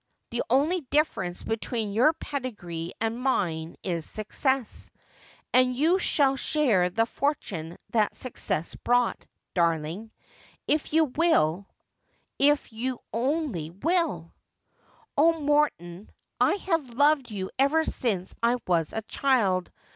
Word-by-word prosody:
The 235 Hz, -, -1 dB
only 300 Hz, +9 st, +2 dB
difference 190 Hz, -, 0 dB
between 225 Hz, -1 st, -2 dB
your 245 Hz, +9 st, +5 dB
pedigree 200 Hz, -, -5 dB
and 225 Hz, +2 st, -2 dB
mine 170 Hz, -11 st, -1 dB
is 170 Hz, -4 st, -2 dB
success; 255 Hz, -, -2 dB, 0.6 s
and 255 Hz, 0 st, +4 dB
you 325 Hz, +8 st, +3 dB
shall 275 Hz, -6 st, +2 dB
share 245 Hz, -11 st, +2 dB
the 225 Hz, +5 st, +1 dB
fortune 195 Hz, -, -3 dB
that 215 Hz, -3 st, +1 dB
success 200 Hz, -9 st, -2 dB
brought, 245 Hz, 0 st, +1 dB, 0.3 s
darling, 170 Hz, +4 st, 0 dB, 0.6 s
if 305 Hz, 0 st, 0 dB
you 320 Hz, +1 st, +4 dB
will 200 Hz, -, +1 dB, 0.4 s
— -, -, -44 dB
if 290 Hz, -5 st, 0 dB
you 250 Hz, +3 st, -3 dB, 0.2 s
only 250 Hz, -, -1 dB
will' 245 Hz, -, -1 dB, 0.4 s
' -, -, -34 dB
Oh, 325 Hz, +2 st, +4 dB
Morton, 285 Hz, -, 0 dB, 0.3 s
I -, -, +4 dB
have 330 Hz, -, -2 dB
loved 285 Hz, -1 st, +3 dB
you 195 Hz, -3 st, -5 dB
ever 290 Hz, +4 st, +4 dB
since 195 Hz, -8 st, -1 dB
I 235 Hz, +1 st, +3 dB
was 165 Hz, -4 st, +1 dB
a 220 Hz, -, -3 dB
child. 210 Hz, -9 st, +1 dB
235 Hz, 125 wpm, -27 LUFS, 185-290 Hz, 0.6 s, your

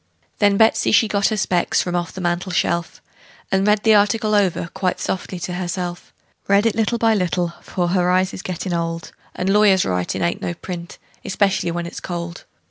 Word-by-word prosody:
Then 205 Hz, -1 st, +4 dB
Betsey 220 Hz, +1 st, +3 dB
she 220 Hz, +1 st, +5 dB
got 200 Hz, -1 st, +1 dB
her 215 Hz, -, -1 dB
specs 180 Hz, -3 st, +1 dB
from 180 Hz, -1 st, -3 dB
off 175 Hz, -1 st, -2 dB
the 190 Hz, -, -7 dB
mantel 175 Hz, +1 st, -1 dB
shelf, 170 Hz, -1 st, -1 dB, 0.5 s
And 190 Hz, +1 st, +2 dB
read 210 Hz, 0 st, +3 dB
the 220 Hz, -, +5 dB
article 215 Hz, +1 st, +3 dB
over 190 Hz, -4 st, +1 dB
quite 185 Hz, -2 st, -1 dB
softly 185 Hz, 0 st, -3 dB
to 180 Hz, -, -4 dB
herself; 175 Hz, -1 st, -4 dB, 0.4 s
Read 200 Hz, +2 st, +4 dB
it 225 Hz, -, +3 dB
by -, -, -2 dB
little 230 Hz, +1 st, 0 dB
and 220 Hz, -2 st, +4 dB
little, 175 Hz, -1 st, -1 dB
for 175 Hz, -2 st, -2 dB
her 180 Hz, 0 st, +2 dB
eyes 185 Hz, +1 st, +2 dB
is -, -, -6 dB
gettin' 180 Hz, 0 st, -4 dB
old, 165 Hz, 0 st, -3 dB, 0.2 s
And 180 Hz, -, -2 dB
lawyers' 200 Hz, -2 st, +4 dB
writin' 90 Hz, -, -1 dB
ain't 170 Hz, -, -1 dB
no 175 Hz, -, -3 dB
print, 175 Hz, 0 st, -7 dB, 0.3 s
especially 195 Hz, -2 st, +1 dB
when 170 Hz, 0 st, -3 dB
it's 170 Hz, -, -7 dB
cold. 170 Hz, -1 st, -6 dB
185 Hz, 200 wpm, -21 LUFS, 175-205 Hz, 0.5 s, she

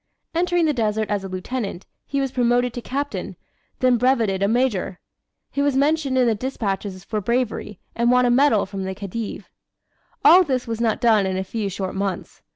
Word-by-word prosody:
Entering 350 Hz, 0 st, +2 dB
the 305 Hz, -, +2 dB
desert 220 Hz, -3 st, -1 dB
as 205 Hz, -2 st, -1 dB
a -, -, -5 dB
Lieutenant, 190 Hz, +1 st, -4 dB, 0.2 s
he 280 Hz, -, -1 dB
was 270 Hz, -2 st, -1 dB
promoted 245 Hz, -1 st, +1 dB
to 245 Hz, -, -5 dB
Captain, 280 Hz, +4 st, -4 dB, 0.5 s
then 250 Hz, -2 st, +4 dB
brevetted 230 Hz, -6 st, +2 dB
a 200 Hz, -, +3 dB
Major. 220 Hz, -5 st, 0 dB, 0.5 s
He 280 Hz, -, -1 dB
was 285 Hz, -1 st, +1 dB
mentioned 280 Hz, -1 st, +1 dB
in 255 Hz, -, +4 dB
the 230 Hz, -, +3 dB
despatches 200 Hz, -5 st, -3 dB
for 215 Hz, +1 st, -3 dB
bravery, 220 Hz, -2 st, -2 dB, 0.2 s
and 235 Hz, +1 st, +2 dB
won 250 Hz, 0 st, +4 dB
a 245 Hz, -, +3 dB
medal 255 Hz, -4 st, +4 dB
from 195 Hz, 0 st, -6 dB
the 190 Hz, 0 st, -4 dB
Khedive. 205 Hz, +3 st, -6 dB, 0.8 s
All 370 Hz, +2 st, +8 dB
this 260 Hz, -6 st, -1 dB
was 230 Hz, -1 st, -4 dB
not 225 Hz, -1 st, +1 dB
done 220 Hz, -5 st, +4 dB
in 190 Hz, 0 st, -2 dB
a 190 Hz, -, -1 dB
few 210 Hz, +1 st, -3 dB
short 190 Hz, 0 st, -4 dB
months. 195 Hz, -2 st, -4 dB
235 Hz, 190 wpm, -22 LUFS, 200-260 Hz, 0.8 s, All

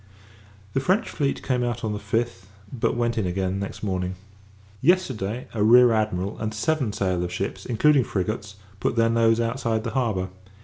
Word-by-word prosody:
The 135 Hz, -, +2 dB
French 185 Hz, +11 st, +1 dB
fleet 140 Hz, -3 st, -1 dB
came 125 Hz, -2 st, 0 dB
out 120 Hz, -1 st, -2 dB
on 110 Hz, -1 st, -1 dB
the 105 Hz, -, -4 dB
5th, 105 Hz, -2 st, -2 dB, 0.3 s
but 120 Hz, -1 st, 0 dB
went 120 Hz, -1 st, 0 dB
in 100 Hz, -, 0 dB
again 95 Hz, +1 st, -1 dB
the -, -, -2 dB
next -, -, -11 dB
morning. 95 Hz, -2 st, -2 dB, 0.7 s
Yesterday, 130 Hz, -, +1 dB
a 110 Hz, -, -2 dB
Rear 120 Hz, +3 st, +7 dB
Admiral, 105 Hz, -3 st, -1 dB
and 110 Hz, 0 st, -3 dB
seven 135 Hz, 0 st, 0 dB
sail 90 Hz, -3 st, -1 dB
of 90 Hz, -, -4 dB
ships, 95 Hz, +2 st, -4 dB
including 135 Hz, +3 st, +4 dB
frigates, 105 Hz, +1 st, -3 dB, 0.2 s
put 100 Hz, -, 0 dB
their 115 Hz, -1 st, +3 dB
nose 115 Hz, 0 st, +3 dB
outside 115 Hz, -1 st, -1 dB
the 115 Hz, -, -3 dB
harbour. 110 Hz, -7 st, 0 dB
110 Hz, 180 wpm, -24 LUFS, 100-120 Hz, 0.7 s, Rear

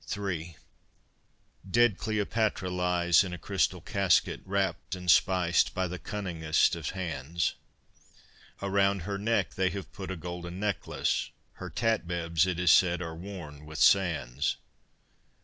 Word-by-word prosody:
III 90 Hz, -5 st, -4 dB, 1.1 s
Dead 120 Hz, -1 st, +3 dB
Cleopatra 110 Hz, -3 st, -1 dB
lies 90 Hz, -1 st, +3 dB
in 90 Hz, -2 st, -5 dB
a -, -, -5 dB
crystal 95 Hz, 0 st, 0 dB
casket, 95 Hz, -1 st, +1 dB
Wrapped 95 Hz, -1 st, -1 dB
and 90 Hz, -1 st, +2 dB
spiced 90 Hz, 0 st, +3 dB
by 95 Hz, 0 st, 0 dB
the 90 Hz, 0 st, -6 dB
cunningest 85 Hz, -6 st, 0 dB
of 80 Hz, -3 st, -4 dB
hands. 85 Hz, -3 st, -2 dB, 1.1 s
Around 100 Hz, -1 st, +2 dB
her 100 Hz, +1 st, -3 dB
neck 115 Hz, +3 st, 0 dB
they 95 Hz, 0 st, +1 dB
have 100 Hz, +1 st, -7 dB
put 95 Hz, -2 st, -7 dB
a 95 Hz, -, -3 dB
golden 85 Hz, +1 st, -6 dB
necklace, 100 Hz, -4 st, -1 dB, 0.3 s
Her -, -, -5 dB
tatbebs, 85 Hz, -7 st, 0 dB
it 90 Hz, -2 st, -2 dB
is 90 Hz, -2 st, +5 dB
said, 90 Hz, 0 st, +5 dB
are 85 Hz, -2 st, -5 dB
worn 85 Hz, -5 st, -9 dB
with 80 Hz, 0 st, -8 dB
sands. 85 Hz, -11 st, +2 dB
90 Hz, 130 wpm, -29 LUFS, 85-100 Hz, 1.1 s, is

